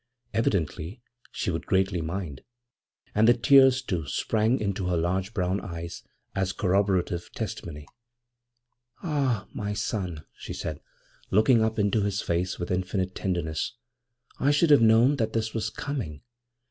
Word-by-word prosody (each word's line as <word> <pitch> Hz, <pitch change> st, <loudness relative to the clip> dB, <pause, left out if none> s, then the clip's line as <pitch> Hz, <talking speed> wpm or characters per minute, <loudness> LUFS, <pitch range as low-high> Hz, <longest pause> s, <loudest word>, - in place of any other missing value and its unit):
Evidently 95 Hz, -2 st, -1 dB, 0.3 s
she -, -, -2 dB
would 80 Hz, -, -4 dB
greatly 95 Hz, -2 st, +1 dB
mind; 80 Hz, -4 st, -4 dB, 0.7 s
and 110 Hz, +2 st, +4 dB
the 120 Hz, -, +7 dB
tears, 130 Hz, +2 st, +6 dB
too, 85 Hz, -, -3 dB
sprang 110 Hz, -, +1 dB
into 100 Hz, -3 st, -2 dB
her 90 Hz, -1 st, +1 dB
large 95 Hz, +4 st, -1 dB
brown 95 Hz, -1 st, 0 dB
eyes 85 Hz, -2 st, -6 dB, 0.3 s
as 95 Hz, -1 st, -1 dB
corroborative 95 Hz, -2 st, 0 dB
testimony. 75 Hz, -3 st, -5 dB, 1.2 s
'Ah, 135 Hz, -, 0 dB
my 105 Hz, 0 st, -3 dB
son,' 95 Hz, -6 st, -3 dB
she -, -, -7 dB
said, 75 Hz, -2 st, -5 dB, 0.5 s
looking 110 Hz, +3 st, +4 dB
up 110 Hz, 0 st, 0 dB
into 105 Hz, +1 st, +2 dB
his 100 Hz, -1 st, 0 dB
face 90 Hz, +2 st, -1 dB
with 85 Hz, -, -4 dB
infinite 95 Hz, 0 st, -1 dB
tenderness,' 85 Hz, -2 st, -2 dB, 0.7 s
I 140 Hz, -, +3 dB
should 150 Hz, +2 st, +4 dB
have 145 Hz, -, +7 dB
known 115 Hz, +5 st, +5 dB
that 110 Hz, -4 st, -1 dB
this 110 Hz, -1 st, -1 dB
was 110 Hz, -1 st, -1 dB
coming. 105 Hz, -, -5 dB
100 Hz, 140 wpm, -27 LUFS, 90-115 Hz, 1.2 s, the